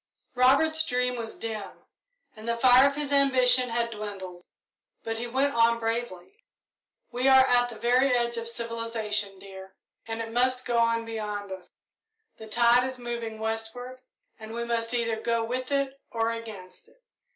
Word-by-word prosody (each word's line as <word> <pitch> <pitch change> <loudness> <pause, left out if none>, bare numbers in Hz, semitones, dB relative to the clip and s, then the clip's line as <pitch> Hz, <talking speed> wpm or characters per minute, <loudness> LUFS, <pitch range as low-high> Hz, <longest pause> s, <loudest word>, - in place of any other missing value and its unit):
Robert's 280 +6 +4
dream 250 -3 0
was 230 -2 -6
dim 220 -3 -7 0.5
and 220 +1 -11
the 235 0 0
fire 255 +2 +7
of 280 - -2
his 290 -1 -3
ambition 255 -2 +4
had 235 0 -1
dwindled, 195 -5 -7 0.6
but 225 0 -3
he 240 - -4
went 270 +4 0
on 230 0 +4
bravely. 230 - -4 0.7
"We 250 +2 0
are 265 -1 +7
at 245 -1 +3
the 235 - -9
very 250 +4 +2
edge 235 0 0
of 230 0 -3
civilisation, 230 -3 -3
dear, 190 0 -12 0.3
and 225 0 -4
it 225 0 -5
must 255 +1 +1
go 240 -1 +1
on 230 0 +2
beyond 210 -3 -5
us. 185 -2 -8 0.7
The 220 - -10
tide 235 +2 +4
is 260 0 -4
moving 235 -2 -5
westward, 225 +3 -5 0.4
and 220 0 -9
we 235 0 -3
must 230 -1 -1
either 230 -2 0
go 230 0 0
with 255 +3 -4
it 275 -1 -1
or 225 0 0
against 220 -5 -9
it. - - -28
235 Hz, 165 wpm, -27 LUFS, 225-250 Hz, 0.7 s, fire